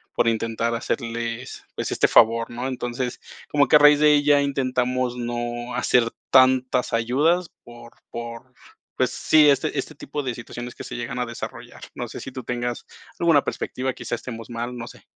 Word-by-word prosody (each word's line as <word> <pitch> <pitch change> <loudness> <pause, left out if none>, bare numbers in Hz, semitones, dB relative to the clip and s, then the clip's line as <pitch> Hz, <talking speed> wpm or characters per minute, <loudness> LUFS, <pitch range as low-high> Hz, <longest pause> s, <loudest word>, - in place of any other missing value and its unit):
por 115 - +2
intentar 115 +1 -1
hacerles, 115 +1 -4
pues, - - -3
este - - +3
favor, 115 0 +4
¿no? 120 +2 -4
Entonces, 125 -1 -3 0.3
como 145 -1 +3
que - - +5
a - - +9
raíz 150 0 +7
de 150 - +5
ahí, 145 -1 +4
intentamos 130 -2 0
no 120 0 -4
hacer 125 -1 +3 0.3
tantas 130 -1 +4
ayudas 150 +10 +2
por 120 0 -13 0.2
por 120 +2 -7 0.5
pues - - +2
sí, 155 -2 +5
este, 140 - +1
este - - -3
tipo 145 +1 -5
de 125 - -2
situaciones 120 +1 -8
que - - -9
se - - -7
llegan 120 +1 -4
a 125 - 0
desarrollar. 115 0 -8
No - - -4
sé - - -8
si 130 - -7
tú 130 -1 -7
tengas 120 0 -3 0.3
alguna 165 -4 +4
perspectiva, 130 +1 -3
quizás 120 - -5
estemos 115 -2 -8
mal, 120 +1 -4
no 120 0 -6
sé. - - -14
125 Hz, 180 wpm, -23 LUFS, 120-135 Hz, 0.5 s, a